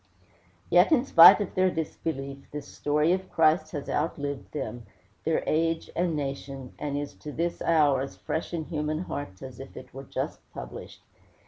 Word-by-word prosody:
Yet 180 - +6
in 275 -5 +4
spite 170 -7 +9
of 200 - -3
their 185 0 +3
disbelief, 140 -4 -4
this 150 -1 -6
story 150 +3 +1
of 190 0 -3
Christ 155 0 +3
has 145 -2 -4
outlived 145 -4 -2
them, 125 -6 -5 0.4
their 160 - +1
age 165 +1 0
and 170 -2 0
nation, 135 -2 -5
and 145 -1 -2
is 145 0 -4
to 150 - -8
this 170 +3 -2
hour 150 -5 +3
as 135 - -5
fresh 160 - -4
in 165 -3 -3
human 155 -1 -2
hearts 135 - -6
as 130 -2 -9
if 135 - -10
it 125 -1 -11
were 135 +1 -8
just - - -4 0.2
published. - - -9
150 Hz, 175 wpm, -27 LUFS, 135-165 Hz, 0.4 s, spite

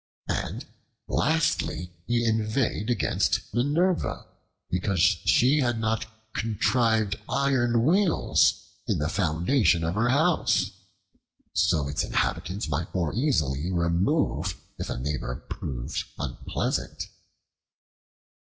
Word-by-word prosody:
And, - - -3 0.4
lastly, 150 - 0 0.2
he 120 0 +1
inveighed 110 0 0
against 120 - 0
Minerva 155 - +1 0.4
because 90 +1 -1
she 105 - +4
had 120 -4 +1
not 110 0 -1 0.3
contrived 110 -1 +1
iron 120 -4 +2
wheels 185 +3 +3 0.2
in - - +1
the 75 +2 -1
foundation 85 - +2
of 80 +1 0
her 110 +5 +1
house, 160 +6 +2 0.8
so 75 -4 +2
its 75 0 -1
inhabitants 95 +4 -1
might 75 +3 -2
more 85 -4 0
easily 85 - 0
remove 85 - +1 0.2
if - - -4
a - - -3
neighbor 65 -1 -3
proved - - -5
unpleasant. - - -3
110 Hz, 100 wpm, -26 LUFS, 85-125 Hz, 0.8 s, she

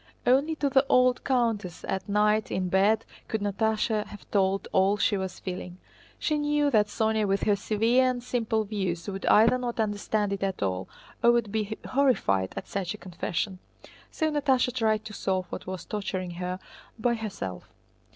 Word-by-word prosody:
Only 280 +6 +3
to 290 - 0
the 270 -1 +4
old 255 0 +4
countess 230 -9 0
at 190 +2 -3
night 210 +1 +2
in 185 -1 -1
bed 200 +4 +3 0.2
could 220 - -1
Natásha 215 +2 0
have 205 - -12
told 195 -1 +1
all 195 +2 +3
she 205 - +2
was 190 -1 -4
feeling. 180 -1 -6 0.4
She 305 -1 0
knew 295 0 +2
that 210 -3 +4
Sónya 220 0 0
with 195 0 0
her 205 - +3
severe 225 +5 +2
and 245 -1 -3
simple 225 -3 0
views 190 -5 -3
would 195 -1 -4
either 225 +4 +5
not 240 -2 -4
understand 205 -1 0
it 200 - -4
at 195 - -1
all 95 -1 -2 0.3
or 235 0 +6
would 235 -4 +1
be 215 0 -2
horrified 245 - +2
at - - -5
such 195 0 -3
a - - -11
confession. 185 +1 -3 0.5
So 315 -1 -1
Natásha 265 -4 +2
tried 220 -3 +1
to 215 - -8
solve 185 -2 -1
what - - -6
was 185 -1 -5
torturing 190 -3 -3
her 180 +1 -4 0.4
by 235 +1 +1
herself. 195 - -5
210 Hz, 175 wpm, -27 LUFS, 190-240 Hz, 0.5 s, or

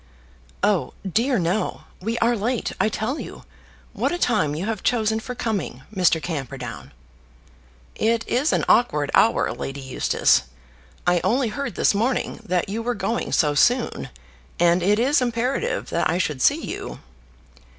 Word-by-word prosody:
"Oh 205 -3 +1
dear, 235 +7 +1
no. 180 +4 -1 0.2
We 225 +4 -2
are 235 +1 +2
late, 230 +3 -1
I - - +3
tell 225 +8 -2
you. - - -8 0.5
What - - 0
a 350 - -1
time 195 - +1
you 170 +5 -3
have 220 -1 -3
chosen 220 -2 +1
for 250 +2 -6
coming, 205 - -3
Mr. 180 -3 +3
Camperdown!" 135 - -6 1.0
"It 225 +1 0
is 280 +6 +1
an - - +1
awkward 150 -12 +3
hour, 225 - +3
Lady 135 +1 -5
Eustace. 130 -1 +2 0.6
I 175 -1 +3
only 245 0 +2
heard 240 -2 -4
this - - +3
morning 230 +5 -1
that 180 -4 0
you 215 +4 -3
were 240 +1 -1
going 210 +3 -2
so 150 -4 +3
soon, 245 - +2 0.5
and 175 +1 +4
it 205 +4 +3
is 265 +5 +3
imperative 250 - -1
that - - +1
I 175 - +1
should 150 -7 -1
see - - +3
you." - - -6
215 Hz, 155 wpm, -23 LUFS, 175-240 Hz, 1.0 s, and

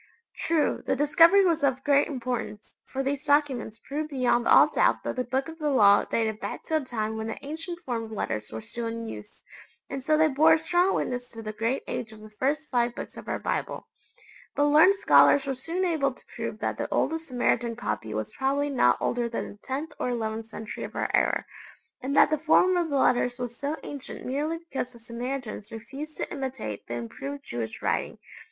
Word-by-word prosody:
True, 325 -2 +1
the - - 0
discovery 330 +7 +6
was 330 -4 +2
of 265 -1 +1
great 285 -1 +4
importance, 245 -5 -4
for 270 0 -3
these 280 +1 -2
documents 275 -7 +1
proved 300 +2 -3
beyond 250 -4 +1
all - - +8
doubt - - +2
that - - -3
the 255 - 0
Book 265 +2 -1
of 325 0 -9
the 300 -1 0
Law 205 -7 +5
dated 220 -2 -1
back - - -5
to 315 - 0
a - - -1
time 220 -4 -3
when 220 0 -3
the 225 - -6
ancient 325 +4 -5
form 235 -6 -3
of 220 - -11
letters 110 - -3
were 110 0 -6
still 235 -1 -5
in 230 0 -4
use, 210 -2 -9 0.5
and 270 -1 -4
so 305 +3 +3
they 315 0 +5
bore 310 +3 +5
a - - +5
strong 350 +4 +2
witness 245 0 -2
to 225 -1 -9
the 215 0 -5
great 230 +5 -1
age 225 -2 -4
of 215 -1 -13
the 215 0 -12
first 285 +7 -1
five 240 -1 +1
Books - - -7
of - - -10
our - - -1
Bible. - - -3 0.7
But 290 0 +3
learned 315 +7 +7
scholars 285 -7 +5
were 270 - -1
soon 335 +8 -2
able 295 -6 +1
to - - -20
prove - - -4
that - - -3
the - - -2
oldest 325 0 0
Samaritan 240 -2 0
copy 115 - -3
was 110 0 -4
probably 280 +2 0
not 260 - +4
older 240 -1 0
than 230 - -4
the 205 - -13
tenth 285 +5 -4
or - - -1
eleventh 225 -2 -3
century 220 -1 -7
of - - -7
our - - -1
era, - - +2 0.6
and 270 +2 -2
that - - +6
the 310 - +1
form 345 +4 +4
of 345 -2 +1
the 285 - +1
letters 245 -1 +2
was 245 -1 -5
so 285 +5 -3
ancient 285 -2 -7
merely 295 +5 -1
because 275 -6 -5
the 235 - -14
Samaritans 235 -1 -5
refused 270 +7 -8
to - - -4
imitate 260 - -5
the 120 - -4
improved 275 - -6
Jewish 115 - -5
writing. - - -1
265 Hz, 215 wpm, -27 LUFS, 230-300 Hz, 0.7 s, all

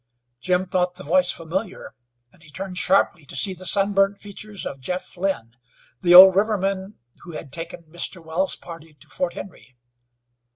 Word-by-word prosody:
Jim 180 +4 0
thought 180 -1 -1
the 185 - -11
voice 180 +4 +3
familiar, 180 +4 -4 0.4
and 180 - -24
he 150 - -18
turned 185 +4 -6
sharply 180 -2 +2
to 140 - -10
see 190 +8 +2
the 185 0 -7
sun 200 0 +3
burnt 195 +1 +2
features 205 0 -8
of 135 - -6
Jeff 180 +10 -5
Lynn, 180 -11 -2 0.5
the 175 -2 +5
old 190 0 +11
riverman 195 -1 -1 0.3
who 175 - -11
had 140 -3 -9
taken 165 +1 -7
Mr. 170 +3 -4
Wells' 170 +3 -1
party 165 -2 -12
to 150 +2 -17
Fort 175 +2 -3
Henry. 160 -9 -11
180 Hz, 170 wpm, -22 LUFS, 165-195 Hz, 0.5 s, old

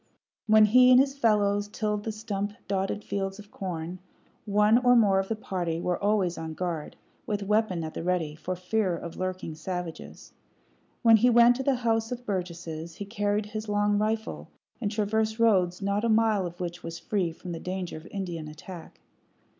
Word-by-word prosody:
When 215 0 +7
he 250 +4 +6
and 250 0 +8
his 275 0 +2
fellows 205 -5 +2
tilled 210 0 -2
the 220 - -1
stump 205 -2 -4
dotted 195 +1 -1
fields 195 -1 -3
of 210 -1 -13
corn, 180 -1 -5 0.5
one 210 +2 +4
or 245 -1 +5
more 200 -5 +5
of 195 - -2
the 225 - -1
party 180 -6 -3
were 180 +2 -2
always 200 -4 +1
on 160 -1 -5
guard, 170 -4 -4 0.3
with 205 -1 -1
weapon 210 -4 +1
at 155 - -5
the - - -5
ready, 170 -3 -1
for 180 +4 -4
fear 185 0 0
of 170 0 -8
lurking 185 -3 -4
savages. 175 +1 -7 0.7
When 225 -1 +8
he 245 +4 +4
went 240 0 +6
to 265 - -3
the 275 0 +2
House 225 0 +1
of 245 0 -5
Burgesses 170 -4 -4
he 200 - -6
carried 205 0 -1
his 215 0 -6
long 205 0 +2
rifle, 220 +1 -2 0.3
and 210 - 0
traversed 220 +1 0
roads 195 -5 +2
not 200 +2 0
a 235 - +1
mile 215 -4 +3
of 175 0 -11
which 175 -1 -5
was 165 -1 -6
free 185 -2 -1
from 175 +2 -9
the 165 - -5
danger 185 0 -4
of 155 +1 -10
Indian 175 -5 -5
attack. 165 +3 -11
200 Hz, 185 wpm, -27 LUFS, 180-215 Hz, 0.7 s, and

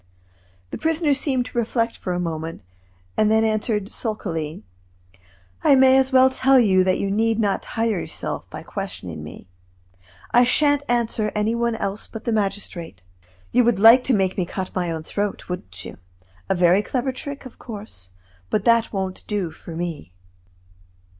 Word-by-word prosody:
The - - -5
prisoner 320 -2 +2
seemed 265 -2 0
to 245 - -8
reflect 230 0 0
for 185 - -5
a 180 - -1
moment, 165 - -4 0.5
and 215 -1 +3
then 220 0 +4
answered, 215 -1 -1
sulkily: 165 - -4 1.0
"I 280 - +6
may 260 0 +6
as 265 0 +3
well 260 0 +6
tell 265 0 +4
you 190 -5 +4
that 185 0 +2
you 195 - -2
need 225 +2 +1
not 200 -3 +1
tire 225 -4 -1
yourself - - -5
by - - -8
questioning - - -6
me. - - -11 0.8
I 245 - +6
shan't 285 +3 +3
answer 235 -3 0
any 210 +2 +1
one 235 0 0
else 200 -1 -3
but 225 - -9
the 235 - 0
magistrate. 195 - -3 0.5
You 250 +1 +4
would 235 -3 +2
like 225 +5 +8
to 260 - +3
make 190 -1 0
me 180 - +1
cut 185 +1 -5
my 180 -2 -1
own 160 -1 -4
throat, 205 +5 -3
wouldn't 95 - -7
you? - - -9 0.5
A - - +2
very 180 +2 +4
clever 255 +4 -2
trick, 280 +2 -7
of 255 - -12
course, 205 - -9 0.4
but - - +1
one - - -22
that 230 -1 +3
won't 190 -1 -4
do 200 -6 -2
for 160 +1 -10
me." 165 - -5
215 Hz, 175 wpm, -22 LUFS, 185-240 Hz, 1.0 s, like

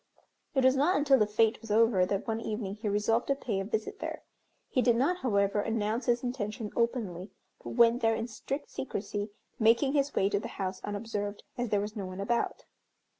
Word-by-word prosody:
It 265 - +3
was 260 +1 +6
not 290 +6 +3
until 280 -2 +4
the 210 - +3
fête 220 +1 +2
was 225 - -11
over 210 -4 +4
that 200 0 -1
one 225 0 -1
evening 210 -3 -3
he 210 +1 -3
resolved 210 +3 +1
to 275 - +2
pay 230 -7 -2
a - - -1
visit 215 +2 -3
there. - - -5 0.4
He 255 - +1
did 240 -2 +4
not, 285 +10 +2
however, 200 - +1
announce 225 +2 -1
his 240 0 +2
intention 225 -3 -3
openly, 215 -6 -1 0.3
but - - -6
went 235 0 +5
there 225 0 +3
in 225 +1 -3
strict 265 +5 -5
secrecy, 205 -4 -4 0.3
making 230 +5 +4
his 280 -1 +1
way 195 - +3
to 200 0 +1
the - - -5
house 190 -1 -3
unobserved, 205 -1 -4
as 245 -1 -2
there 205 -1 +2
was 210 +2 -5
no 200 -3 -4
one 185 +1 -7
about. 235 +4 -1
225 Hz, 205 wpm, -30 LUFS, 205-245 Hz, 0.4 s, was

